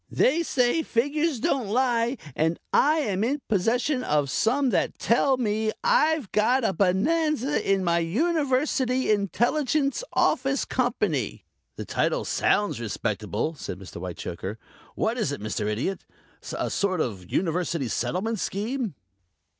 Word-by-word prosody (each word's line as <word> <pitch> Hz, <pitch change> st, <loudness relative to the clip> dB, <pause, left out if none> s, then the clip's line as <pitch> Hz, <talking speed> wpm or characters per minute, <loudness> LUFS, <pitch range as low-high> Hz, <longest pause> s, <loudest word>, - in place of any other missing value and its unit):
They 305 Hz, +6 st, +3 dB
say 260 Hz, -1 st, +2 dB
figures 290 Hz, +2 st, 0 dB
don't 265 Hz, -4 st, 0 dB
lie, 240 Hz, +2 st, +1 dB, 0.2 s
and 160 Hz, +2 st, +1 dB
I 310 Hz, +2 st, +4 dB
am 205 Hz, -6 st, -1 dB
in 275 Hz, +4 st, -1 dB
possession 245 Hz, +7 st, +1 dB
of 145 Hz, -, +1 dB
some 255 Hz, -, +2 dB
that -, -, 0 dB
tell 260 Hz, +3 st, +2 dB
me 220 Hz, -2 st, 0 dB
I've 320 Hz, -, +2 dB
got 240 Hz, +5 st, +2 dB
a 195 Hz, -, +1 dB
bonanza 285 Hz, -, +1 dB
in 195 Hz, -1 st, +2 dB
my 170 Hz, -1 st, +2 dB
University 260 Hz, -, +1 dB
Intelligence 260 Hz, -, +1 dB
Office 270 Hz, +2 st, +1 dB
Company." 210 Hz, -, -1 dB, 0.3 s
"The -, -, -6 dB
title -, -, 0 dB
sounds 205 Hz, -, +1 dB
respectable," 110 Hz, +4 st, -2 dB
said 135 Hz, -, -6 dB
Mr. 95 Hz, -2 st, -10 dB
Whitechoker. 90 Hz, +3 st, -5 dB, 0.4 s
"What 230 Hz, +3 st, 0 dB
is 155 Hz, -, 0 dB
it, 140 Hz, -, -4 dB
Mr. 105 Hz, 0 st, -3 dB
Idiot 115 Hz, -, -2 dB, 0.5 s
a -, -, -2 dB
sort 190 Hz, -3 st, 0 dB
of 95 Hz, -, -3 dB
University 170 Hz, -5 st, 0 dB
Settlement 205 Hz, -, -1 dB
Scheme?" 220 Hz, -, -2 dB
225 Hz, 130 wpm, -26 LUFS, 170-270 Hz, 0.5 s, I